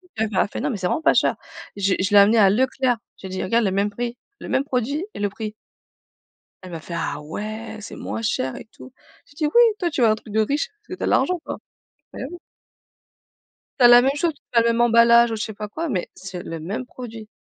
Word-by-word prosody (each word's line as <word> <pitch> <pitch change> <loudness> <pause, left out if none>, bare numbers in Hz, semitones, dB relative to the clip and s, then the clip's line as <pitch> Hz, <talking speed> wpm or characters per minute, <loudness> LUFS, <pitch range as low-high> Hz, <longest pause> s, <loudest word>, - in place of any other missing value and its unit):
elle 220 0 -1
m'a 190 - +2
fait: 205 - -6
«Non, 295 - -1
mais 230 - -2
c'est 180 -1 -1
vraiment 315 - -1
pas - - +4
cher.» - - +2 0.4
Je 195 -1 +1
l'ai - - -2
je 195 - -1
l'ai 205 - +6
amené 210 +3 +6
à 200 -3 +6
Leclerc, 255 +2 +1 0.2
j'ai 190 - -9
dit: 185 - -3
«Regarde 230 +4 +2
le 190 - +1
même 200 +2 +1
prix, 240 +3 -5 0.2
le - - -8
même 265 - +1
produit 280 - -2
et - - -8
le 205 - +1
prix.» 215 +1 -6 1.1
Elle 185 - -10
m'a 165 - -5
fait: 170 - -8
«Ah 150 -2 -3
ouais 215 +8 -6
c'est 215 - -9
moins 225 - -5
cher 130 - -1
et - - -10
tout.» 260 - -13 0.3
J'ai 285 - -21
dit: 305 - 0
«Oui 480 - +8 0.2
toi 345 -2 -1
tu 290 - -3
veux 225 - +6
un 215 - +4
truc 215 -1 -12
de 220 - +3
riche 280 +7 0
parce 425 - -38
que 370 - -5
tu - - -10
as - - +1
l'argent, 360 -1 +2
quoi», - - -5 0.6
beh, - - -7
oui. 355 - -8 1.4
Tu - - +6
as - - +10
la 240 0 +8
même 270 - +3
chose, 330 +2 +1 0.2
pas 235 - +4
le 230 - +1
même 230 0 +1
emballage 235 0 +6
ou 225 - -2
je 215 - -4
sais 220 - -7
pas 210 0 -6
quoi, 325 +8 -4
mais 185 -9 -2
c'est 190 -2 -8
le 165 -4 -6
même 195 +10 -4
produit. 230 -4 -9
225 Hz, 260 wpm, -22 LUFS, 200-250 Hz, 1.4 s, as